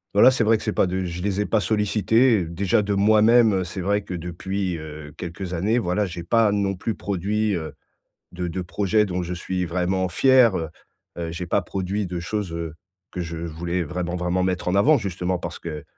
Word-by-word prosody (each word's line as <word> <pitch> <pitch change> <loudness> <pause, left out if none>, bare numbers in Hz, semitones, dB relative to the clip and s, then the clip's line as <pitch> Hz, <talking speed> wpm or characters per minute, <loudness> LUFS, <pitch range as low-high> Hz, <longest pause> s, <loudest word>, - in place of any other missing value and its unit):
voilà, 105 +6 +8
c'est 125 -3 +1
vrai 110 +1 +4
que - - -9
c'est 110 - -1
pas 95 - +2
de 95 +1 -2
je 90 0 -5
les 100 0 0
ai - - 0
pas 110 - +2
sollicités 110 +4 +2
et 90 - -2
déjà 90 +5 +1
de 100 0 -1
moi-même, 110 +2 +5
heu, - - -1
c'est 90 +2 -6
vrai 100 +3 +1
que 95 - -6
depuis, 90 +2 -3
heu, 75 -1 -9
quelques 90 +1 -6
années, 100 +7 +1
voilà, 100 0 0
j'ai 85 -1 -6
pas 115 +3 +3
non 100 -1 0
plus 105 +4 -3
produit, 100 +2 -1
heu, 80 -2 -5 0.6
de 90 0 -3
de 90 +2 -3
projets 105 +4 +1
dont 90 -1 -2
je 90 +1 -4
suis 90 +1 -3
vraiment 90 +2 0
fier. 125 +2 +5
Heu 80 - -3 0.5
heu 85 -1 -3
j'ai 85 +1 -5
pas - - +1
produit 95 +1 -3
de 90 0 -4
choses, 100 0 -3
heu, 85 -2 -5 0.4
que 90 - -4
je 85 -1 -5
voulais 85 +2 -3
vraiment, 90 +2 -3
vraiment 90 +1 0
mettre 90 -1 -1
en 90 - +1
avant 140 +9 +5
justement 90 -2 -2
parce - - -6
que 75 -3 -6
95 Hz, 220 wpm, -23 LUFS, 85-105 Hz, 0.6 s, voilà